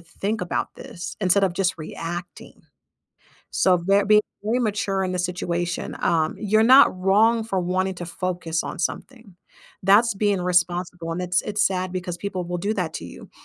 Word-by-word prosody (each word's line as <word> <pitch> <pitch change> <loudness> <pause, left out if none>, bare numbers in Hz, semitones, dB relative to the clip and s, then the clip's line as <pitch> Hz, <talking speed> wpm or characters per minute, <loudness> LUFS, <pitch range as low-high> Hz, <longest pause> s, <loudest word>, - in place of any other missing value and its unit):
think 200 +6 -4
about 180 - -3
this 175 - -8
instead 195 +1 +3
of 185 - 0
just 185 +1 0
reacting. 170 +2 -7 0.9
So, 185 -1 +3
ve 195 +4 +3
being 210 +1 +5 0.2
very 225 +4 0
mature 200 -3 -1
in 185 - -2
the 180 - -2
situation, 175 -1 -3
um, 160 -2 +1
you're 215 +1 +2
not 260 +1 +7
wrong 220 +5 +3
for 195 -4 -1
wanting 185 +2 -1
to 175 - -6
focus 175 -2 -3
on - - -6
something. 220 - -5 0.5
That's 210 +4 +4
being 200 -1 +1
responsible, 175 -1 0
and 180 - -3
it's 180 0 +1
it's 210 +1 +1
sad 185 -1 -2
because 180 -1 -4
people 190 -3 -4
will 175 +1 -4
do 205 +5 -1
that 175 -5 -2
to 85 - -5
you. - - -12
185 Hz, 175 wpm, -23 LUFS, 175-205 Hz, 0.9 s, not